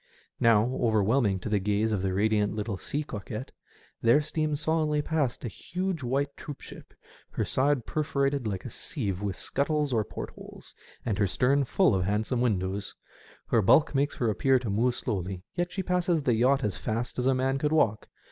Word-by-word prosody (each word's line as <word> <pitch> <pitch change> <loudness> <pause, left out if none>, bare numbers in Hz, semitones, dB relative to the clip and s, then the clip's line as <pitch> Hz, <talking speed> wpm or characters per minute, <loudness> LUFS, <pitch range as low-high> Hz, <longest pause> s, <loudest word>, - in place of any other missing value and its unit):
Now, 115 -2 +5 0.2
over 110 -4 +3
whelming 110 -2 +2
to - - -5
the 105 -1 +2
gaze 105 +3 0
of 100 -3 0
the 95 0 0
radiant 105 +2 +1
little 105 -1 -2
sea 145 +10 -3
coquette, 110 -1 -6 0.5
there 115 +5 +5
steams 150 0 -1
solemnly 155 -2 +1
past 145 -7 -1
a - - -1
huge 180 - -4
white 140 +3 -1
troopship, 145 - -10 0.3
her - - -2
side 135 -2 +1
perforated 140 -4 0
like 95 -3 -4
a - - -6
sieve 95 -2 -3
with 100 -2 -2
scuttles 145 - -1
or 110 -2 +2
port - - -7
holes, - - -13 0.3
and 105 -4 -1
her 100 - +3
stern 135 +7 +2
full 180 - +3
of 95 -2 +1
handsome 110 +5 0
windows. 100 -3 -1 0.5
Her 115 - +4
bulk 145 +11 +4
makes 140 +1 +1
her 115 -3 +1
appear 130 +5 +3
to 120 -5 -3
move 120 +4 +2
slowly, 95 -4 -3
yet 175 0 -2
she 190 - -3
passes 180 -3 +1
the 125 - +2
yacht 130 +4 +3
as 100 -4 -1
fast 115 +3 -3
as 125 - +1
a 135 - +4
man 135 +1 0
could 150 +1 0
walk. 115 -9 +2
120 Hz, 190 wpm, -28 LUFS, 105-145 Hz, 0.5 s, Now